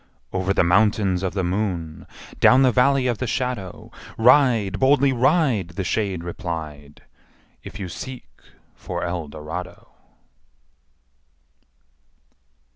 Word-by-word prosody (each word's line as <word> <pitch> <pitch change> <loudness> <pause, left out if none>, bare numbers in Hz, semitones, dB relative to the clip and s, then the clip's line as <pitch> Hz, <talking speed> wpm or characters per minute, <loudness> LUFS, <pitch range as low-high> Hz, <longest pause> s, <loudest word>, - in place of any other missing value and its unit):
'' - - -38
Over 95 0 -1
the 100 - +2
Mountains 95 0 +2
Of 95 -2 -2
the 95 - -1
Moon, 90 -4 -3 0.3
Down 130 +1 +6
the 130 - +4
Valley 130 +2 +3
of 120 -3 -1
the 130 - -2
Shadow, 120 -6 -4 0.3
Ride, 115 -5 +3
boldly 140 0 +3
ride,'' 125 - +1
The 95 - -2
shade 95 -3 -2
replied, 80 -6 -7 0.6
``If - - -9
you 95 -3 -5
seek 125 - -8 0.5
for - - -6
Eldorado!'' 80 0 -6
100 Hz, 115 wpm, -22 LUFS, 85-125 Hz, 0.6 s, Down